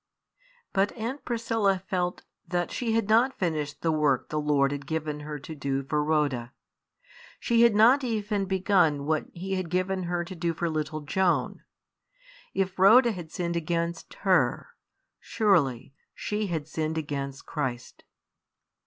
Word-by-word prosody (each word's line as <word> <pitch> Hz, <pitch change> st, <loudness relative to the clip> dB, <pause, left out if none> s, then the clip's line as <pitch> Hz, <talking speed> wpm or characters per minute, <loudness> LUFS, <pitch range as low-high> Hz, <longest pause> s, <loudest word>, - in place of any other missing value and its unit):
But 195 Hz, +1 st, +2 dB
Aunt 245 Hz, +5 st, -5 dB
Priscilla 225 Hz, -5 st, 0 dB
felt 180 Hz, -1 st, -2 dB, 0.2 s
that 175 Hz, -1 st, -1 dB
she 230 Hz, -3 st, -1 dB
had 225 Hz, -2 st, +1 dB
not 235 Hz, +5 st, +3 dB
finished 155 Hz, -5 st, -2 dB
the 165 Hz, -, +2 dB
work 150 Hz, -4 st, +1 dB
the 155 Hz, 0 st, -1 dB
Lord 145 Hz, -2 st, +2 dB
had 140 Hz, -1 st, -5 dB
given 155 Hz, -2 st, -3 dB
her 150 Hz, 0 st, -6 dB
to 145 Hz, +3 st, -9 dB
do 140 Hz, -2 st, -2 dB
for 150 Hz, +2 st, 0 dB
Rhoda; 145 Hz, -5 st, 0 dB, 0.9 s
she 235 Hz, -1 st, +2 dB
had 235 Hz, -3 st, +5 dB
not 245 Hz, +6 st, +6 dB
even 210 Hz, -4 st, -1 dB
begun 185 Hz, -7 st, +2 dB
what 155 Hz, 0 st, 0 dB
He 190 Hz, +3 st, -5 dB
had 185 Hz, -3 st, -3 dB
given 185 Hz, +1 st, -1 dB
her 175 Hz, 0 st, -1 dB
to 185 Hz, -, -8 dB
do 170 Hz, -1 st, -2 dB
for 170 Hz, 0 st, -1 dB
little 155 Hz, 0 st, -3 dB
Joan. 180 Hz, +5 st, 0 dB, 0.9 s
If 190 Hz, 0 st, -2 dB
Rhoda 235 Hz, +6 st, +7 dB
had 175 Hz, -6 st, -8 dB
sinned 170 Hz, -1 st, -2 dB
against 170 Hz, 0 st, -2 dB
her, -, -, +2 dB, 0.5 s
surely 140 Hz, -, +1 dB, 0.2 s
she 210 Hz, 0 st, -2 dB
had 160 Hz, -4 st, -3 dB
sinned 160 Hz, 0 st, -2 dB
against 140 Hz, -3 st, -4 dB
Christ. 130 Hz, -6 st, -4 dB
170 Hz, 150 wpm, -27 LUFS, 150-195 Hz, 0.9 s, Rhoda